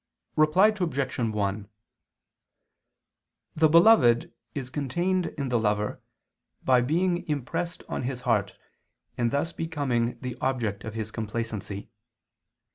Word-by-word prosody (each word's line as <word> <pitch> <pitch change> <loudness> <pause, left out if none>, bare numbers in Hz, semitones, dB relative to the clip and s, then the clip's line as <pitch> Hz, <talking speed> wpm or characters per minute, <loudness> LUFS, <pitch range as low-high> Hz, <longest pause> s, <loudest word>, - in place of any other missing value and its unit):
Reply 155 +7 +5
Obj. 165 -13 -2
1: 105 -3 -1 1.9
The 155 0 +4
beloved 165 - +5 0.2
is 130 -3 -5
contained 175 +6 0
in 140 -2 -2
the 120 -2 +2
lover, 105 -1 -1 0.6
by 130 -1 +4
being 175 +7 +1
impressed 150 +4 -3
on - - -3
his 125 0 -3
heart 100 -5 0 0.6
and 120 -1 +1
thus 145 +6 -1
becoming 140 -8 -1
the 125 -2 -4
object 115 -6 -1
of 110 0 -6
his 110 -1 -4
complacency. 110 -2 -4
125 Hz, 115 wpm, -27 LUFS, 110-160 Hz, 1.9 s, Reply